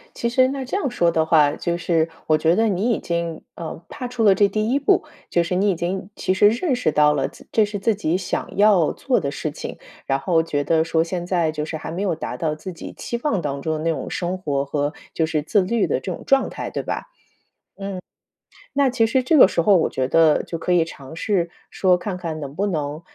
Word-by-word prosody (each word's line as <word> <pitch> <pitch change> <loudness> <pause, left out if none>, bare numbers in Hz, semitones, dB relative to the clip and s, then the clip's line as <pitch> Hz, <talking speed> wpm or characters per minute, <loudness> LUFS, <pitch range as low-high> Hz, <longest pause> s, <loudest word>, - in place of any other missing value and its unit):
其 235 - -1
实 255 +2 +4
那 270 0 -4
这 260 - -4
样 335 -9 0
说 170 -8 +2
的 160 -1 +1
话， 150 -3 +5
就 170 0 -2
是 165 -2 +1 0.2
我 155 -1 +3
觉 165 +2 +3
得 225 +1 +3
你 205 +3 0
已 225 - 0
经， 170 -1 -3
嗯， 165 -1 -6
踏 250 - -6
出 245 -2 -2
了 200 -3 +7
这 200 +1 +4
第 215 +2 -1
1 280 - +2
步， 285 - +3 0.3
就 170 - +2
是 170 - -3
你 200 +3 +2
已 190 - +1
经 185 +3 -3
其 185 - 0
实 205 +2 +5
认 255 +5 0
识 155 - 0
到 150 0 +4
了， 145 - 0
自 - - -15
这 220 - +4
是 205 0 -3
自 220 +3 +1
己 180 -4 0
想 185 0 -4
要 200 -6 +5
做 255 -4 0
的 140 -6 -2
事 150 +2 -4
情， - - -7 0.3
然 135 - +2
后 165 +2 +2
觉 145 -3 -2
得 160 +2 +2
说 165 0 +1
现 175 +1 -4
在 170 -4 +1
就 150 -1 -3
是 160 - -4
还 155 - -7
没 175 +4 -4
有 185 -5 0
达 - - -5
到 155 -2 -1
自 185 +4 -8
己 165 - -8
期 235 - -4
望 230 -10 +1
当 140 -1 -3
中 160 - -1
的 - - -4
那 165 - +2
种 160 - -4
生 180 +1 -2
活 140 -5 -1
和， 145 +1 -1 0.2
就 160 - +1
是， 155 -2 -1
自 200 +5 +2
律 215 +3 +1
的 - - 0
这 185 - -5
种 - - -7
状 270 0 +3
态， - - -6
对 - - -2
吧？ - - -3
嗯。 - - -38 1.6
那 280 -2 +4
其 230 -3 +2
实 255 +3 +1
这 305 +5 +3
个 250 - +9
时 170 - 0
候 200 +3 +5
我 170 - +3
觉 130 -1 -1
得 160 +1 +4
就 165 - -5
可 180 - -2
以 170 -2 +4
尝 145 -2 -11
试 175 -2 0 0.2
说， 185 -2 +3
看 185 +1 -4
看 165 -3 -5
能 140 -1 -7
不 200 +3 0
能 150 -4 -3
175 Hz, 270 characters per minute, -22 LUFS, 160-210 Hz, 1.6 s, 个